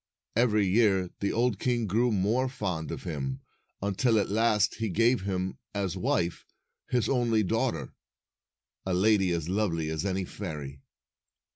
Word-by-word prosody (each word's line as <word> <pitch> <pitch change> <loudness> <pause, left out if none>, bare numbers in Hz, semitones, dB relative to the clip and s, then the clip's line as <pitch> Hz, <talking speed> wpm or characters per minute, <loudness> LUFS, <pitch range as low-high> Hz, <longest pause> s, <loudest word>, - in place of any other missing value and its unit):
Every 110 -3 +3
year 95 -2 +3
the 100 - 0
old 120 -3 +1
king 120 -2 0
grew 115 +5 +2
more 110 +6 +1
fond 90 - -3
of - - -5
him, 70 -5 -4 0.4
until 110 +4 +2
at 105 - +1
last 105 -1 +3
he 110 -1 -2
gave 115 +6 +3
him, 95 -1 -3 0.2
as 95 -3 -1
wife, 85 -2 0 0.5
his 125 -2 +1
only 120 -4 +2
daughter, 90 - -1 0.9
a 95 -1 -1
lady 95 0 +3
as 85 -2 -1
lovely 85 -5 0
as 80 +1 -2
any 95 -1 -1
fairy. 75 -9 -7
100 Hz, 145 wpm, -28 LUFS, 90-115 Hz, 0.9 s, Every